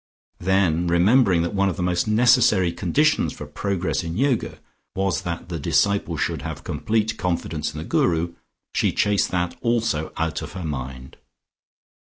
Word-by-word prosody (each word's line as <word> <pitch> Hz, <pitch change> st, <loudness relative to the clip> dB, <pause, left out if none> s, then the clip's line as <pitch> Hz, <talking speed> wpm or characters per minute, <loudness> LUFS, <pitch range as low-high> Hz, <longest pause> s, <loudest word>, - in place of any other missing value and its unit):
Then 90 Hz, -2 st, +2 dB
remembering 90 Hz, +1 st, +4 dB
that 85 Hz, -, -3 dB
one 100 Hz, -1 st, +2 dB
of 90 Hz, -, -4 dB
the 90 Hz, -, -2 dB
most 90 Hz, +2 st, 0 dB
necessary 110 Hz, -5 st, +4 dB
conditions 150 Hz, -, +1 dB
for 75 Hz, -, -8 dB
progress 90 Hz, +5 st, -2 dB
in 85 Hz, +2 st, -4 dB
Yoga, 130 Hz, -1 st, 0 dB, 0.4 s
was 95 Hz, 0 st, 0 dB
that 85 Hz, -1 st, -5 dB
the 85 Hz, -2 st, -4 dB
disciple 100 Hz, +2 st, +1 dB
should 80 Hz, -1 st, -1 dB
have 75 Hz, -3 st, -6 dB
complete 110 Hz, 0 st, -1 dB
confidence 85 Hz, -4 st, -2 dB
in 75 Hz, -, -10 dB
the 75 Hz, -, -4 dB
Guru, 85 Hz, 0 st, +1 dB, 0.4 s
she -, -, +2 dB
chased 105 Hz, -1 st, +2 dB
that 90 Hz, -1 st, -1 dB
also 115 Hz, -9 st, 0 dB
out 80 Hz, 0 st, -1 dB
of 75 Hz, 0 st, -8 dB
her 95 Hz, -3 st, -5 dB
mind. 65 Hz, -3 st, -6 dB
90 Hz, 160 wpm, -23 LUFS, 80-100 Hz, 0.4 s, remembering